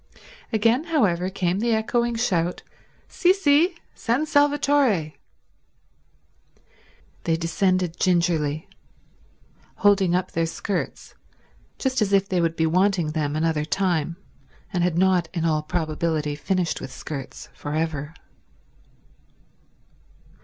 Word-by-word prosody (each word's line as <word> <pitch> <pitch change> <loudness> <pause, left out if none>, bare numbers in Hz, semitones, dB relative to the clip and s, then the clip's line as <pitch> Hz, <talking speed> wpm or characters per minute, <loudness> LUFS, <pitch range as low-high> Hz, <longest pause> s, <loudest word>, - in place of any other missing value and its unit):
Again, 230 +6 +2
however, 190 - +1
came 185 -1 -1
the 230 0 +2
echoing 235 +2 0
shout—"Sì, 205 - -1
sì—San 310 - +1
Salvatore." 285 - +2 2.1
They 165 -1 +2
descended 180 +1 0
gingerly, 170 -4 +1 1.1
holding 195 -3 +3
up 180 - -1
their 165 0 0
skirts 190 +3 -4 0.6
just 265 -3 -1
as 200 -1 +1
if 195 0 +3
they 185 -3 0
would 165 -1 0
be 160 - +1
wanting 180 -1 +2
them 150 -2 -2
another 155 -1 0
time 170 -1 -1 0.6
and 175 -2 +1
had 175 -2 0
not 180 -2 +2
in 165 -1 0
all 155 -2 +1
probability 155 -1 -2
finished 180 +3 -1
with 135 - -7
skirts 135 -2 -7
for 145 +1 -5
ever. 155 -1 -2
180 Hz, 105 wpm, -24 LUFS, 160-220 Hz, 2.1 s, holding